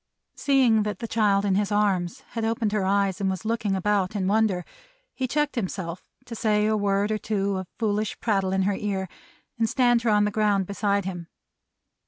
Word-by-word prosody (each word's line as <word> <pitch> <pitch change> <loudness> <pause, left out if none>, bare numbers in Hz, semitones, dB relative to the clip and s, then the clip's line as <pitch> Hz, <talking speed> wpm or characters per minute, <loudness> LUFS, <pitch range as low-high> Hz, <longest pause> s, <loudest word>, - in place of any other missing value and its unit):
'" - - -56
Seeing 255 -6 +3
that 210 -2 -2
the 230 - -5
child 205 -3 +2
in 195 - +2
his 205 +2 0
arms 195 -4 0
had 230 - -4
opened 225 -1 0
her 205 -2 0
eyes, 200 0 +1
and 195 - +1
was 190 +3 -4
looking 220 -3 0
about 195 0 0
in 195 -2 -1
wonder, 205 -3 +1 0.5
he 260 - -2
checked 295 +3 0
himself 185 -5 -4 0.2
to 240 - -8
say 210 -2 +1
a 215 0 +2
word 200 0 +1
or 215 - 0
two 200 -2 -1
of 185 -1 -5
foolish 215 -2 -1
prattle 195 -4 0
in 190 0 +1
her 200 +1 +1
ear, 195 -1 -2 0.5
and 225 -1 +2
stand 240 -2 +3
her 235 - 0
on 210 -1 +4
the 210 - 0
ground 205 -2 +1
beside 200 0 0
him. 175 -3 -5
205 Hz, 205 wpm, -25 LUFS, 195-220 Hz, 0.5 s, on